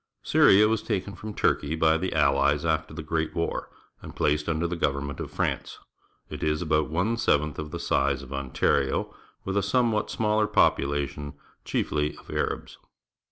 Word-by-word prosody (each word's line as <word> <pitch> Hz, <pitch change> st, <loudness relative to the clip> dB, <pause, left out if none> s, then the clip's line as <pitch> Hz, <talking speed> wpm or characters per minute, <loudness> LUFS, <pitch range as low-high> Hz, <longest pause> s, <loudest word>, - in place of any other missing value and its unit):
— -, -, -52 dB
Syria 100 Hz, +2 st, +6 dB
w^as 110 Hz, -1 st, 0 dB
takeiV 100 Hz, +1 st, -3 dB
from 105 Hz, -1 st, -8 dB
Turkey 75 Hz, +2 st, +1 dB
by 80 Hz, 0 st, +3 dB
the 95 Hz, -, -1 dB
.\lUes 70 Hz, 0 st, +2 dB
after 80 Hz, -2 st, 0 dB
the 80 Hz, 0 st, -7 dB
Great 80 Hz, 0 st, -2 dB
War 85 Hz, -, -2 dB, 0.3 s
and -, -, -10 dB
placed 75 Hz, +2 st, +1 dB
under 85 Hz, +1 st, 0 dB
the 85 Hz, +1 st, -2 dB
government 70 Hz, -3 st, -2 dB
of -, -, -5 dB
France. -, -, -2 dB, 0.5 s
It -, -, -8 dB
is 75 Hz, 0 st, 0 dB
about 75 Hz, -2 st, +1 dB
one 95 Hz, +9 st, 0 dB
seventh 75 Hz, -8 st, +1 dB
of 75 Hz, -1 st, -5 dB
the -, -, -6 dB
size 70 Hz, -1 st, 0 dB
of 70 Hz, 0 st, -9 dB
Ontario, 70 Hz, 0 st, 0 dB, 0.3 s
with 95 Hz, -, -2 dB
a 100 Hz, -, +3 dB
somewhat 110 Hz, +2 st, +1 dB
smaller 105 Hz, -1 st, +1 dB
population, 70 Hz, -2 st, +1 dB, 0.3 s
chief!}' -, -, -1 dB
of 75 Hz, 0 st, -2 dB
Arabs. -, -, -3 dB
80 Hz, 170 wpm, -26 LUFS, 70-95 Hz, 0.5 s, Syria